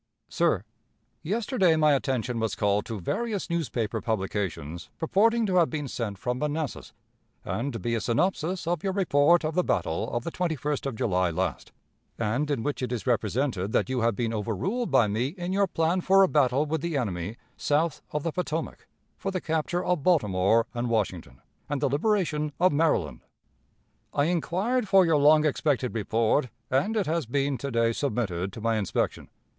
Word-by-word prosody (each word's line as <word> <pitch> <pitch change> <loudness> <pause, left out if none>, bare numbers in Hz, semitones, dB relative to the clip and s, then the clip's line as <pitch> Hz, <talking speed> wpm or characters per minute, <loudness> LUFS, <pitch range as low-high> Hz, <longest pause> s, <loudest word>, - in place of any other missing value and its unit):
"Sir: - - +1 0.6
Yesterday 205 - +1
my 155 -2 +4
attention 125 -3 -1
was 110 -1 -1
called 105 0 +1
to 110 -3 -4
various 210 - -2
newspaper 130 -10 -1
publications 95 -7 -3
purporting 225 +7 +2
to 185 -3 +1
have 170 -2 +4
been 150 -3 -3
sent 110 -5 -4
from 125 +5 -2
Manassas, 150 -1 -3 0.5
and 135 +5 -2
to 115 - -4
be 115 +3 -2
a 115 - 0
synopsis 175 +7 0
of 170 -1 -1
your 195 -1 0
report 170 -3 +3
of 155 - -1
the 180 +2 +2
battle 85 - -1
of 120 0 -2
the 170 - -4
21st 150 -5 -2
of 135 - -4
July 90 -4 +1
last, 90 +3 -3 0.5
and 120 +7 -1
in 135 -6 -1
which 145 -1 -2
it 125 - -2
is 120 -3 -3
represented 115 -3 0
that - - +1
you 130 -2 0
have 115 -2 +2
been 115 0 -1
overruled 115 - -2
by 130 -5 +4
me 110 +5 0
in 180 +1 -3
your 200 0 +3
plan 170 +1 0
for 195 +2 +5
a - - +5
battle 140 -2 +2
with 155 0 -2
the 170 -2 -1
enemy 100 -3 -3 0.2
south 150 +1 0
of 150 -1 -3
the 165 - -1
Potomac, 165 -1 -4 0.3
for 195 - -2
the 185 -1 -2
capture 160 +2 -1
of 180 -4 +1
Baltimore 115 - +3
and 120 0 -2
Washington, 90 - -2 0.3
and 145 -1 -1
the 140 - +1
liberation 150 - 0
of 180 -2 +4
Maryland. 95 - +1 0.9
"I 145 - +3
inquired 190 +8 0
for 190 -1 +6
your 165 -2 +3
long 150 +2 +5
expected 140 -4 0
report, 115 +4 +1 0.2
and 200 - +1
it 205 - +1
has 160 -4 -1
been 140 +1 0
to 140 - -3
day 115 -2 +2
submitted 105 -9 -2
to 115 - -8
my 115 0 +1
inspection. 100 - -2
140 Hz, 180 wpm, -27 LUFS, 115-170 Hz, 0.9 s, for